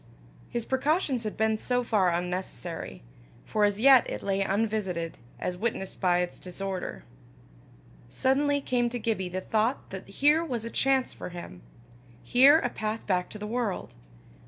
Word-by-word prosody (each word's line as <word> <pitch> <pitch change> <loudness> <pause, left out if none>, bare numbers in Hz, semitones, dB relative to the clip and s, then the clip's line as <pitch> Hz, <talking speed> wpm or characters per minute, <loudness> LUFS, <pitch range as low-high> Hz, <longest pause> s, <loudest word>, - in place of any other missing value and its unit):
His 235 -1 -3
precautions 270 -2 +1
had 215 - -4
been 220 0 +1
so 250 +1 0
far 210 -6 +2
unnecessary, 175 - -4 0.4
for 210 -1 +2
as 205 0 +1
yet 265 +1 +7
it - - -5
lay 195 0 0
unvisited, 195 -5 -1 0.2
as 180 0 -3
witnessed 210 -3 -3
by 180 -2 +3
its 180 - -4
disorder. 190 +1 -5 1.1
Suddenly 280 - +1
came 245 -2 +1
to 245 - -4
Gibbie 215 -5 -1
the 185 +1 -3
thought 220 +7 0
that 190 -1 -7
here 295 +10 +3
was 245 -8 -3
a 230 - -5
chance 265 -1 +1
for - - -7
him 170 - -9 0.6
here 265 - +7
a 245 - 0
path 215 +1 -3
back 180 -2 0
to - - -7
the 210 - -6
world. 225 -2 -2
215 Hz, 155 wpm, -28 LUFS, 185-250 Hz, 1.1 s, yet